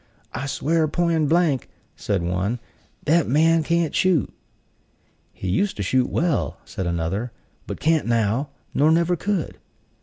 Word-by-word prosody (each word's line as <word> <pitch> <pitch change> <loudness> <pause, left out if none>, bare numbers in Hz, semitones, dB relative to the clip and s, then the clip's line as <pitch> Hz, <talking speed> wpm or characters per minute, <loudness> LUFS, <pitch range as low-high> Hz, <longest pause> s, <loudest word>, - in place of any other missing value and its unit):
"I 135 - -3
swear 155 +3 +1
poin' 165 -1 +1
blank," 160 -5 +2 0.3
said 100 -4 -1
one, 90 +7 -1 0.5
"that 165 +1 +3
man 160 +5 +4
can't 170 0 0
shoot." 180 -7 +2 1.0
"He 95 - -7
used 195 - 0
to 100 - -2
shoot 125 +6 +1
well," 165 -4 0
said 95 - -4
another; 85 +8 -2 0.4
"but - - -5
can't 160 -3 +2
now, 115 +4 +1 0.2
nor 150 +2 +4
never 170 +2 +3
could." 190 0 -2
150 Hz, 140 wpm, -23 LUFS, 110-165 Hz, 1.0 s, man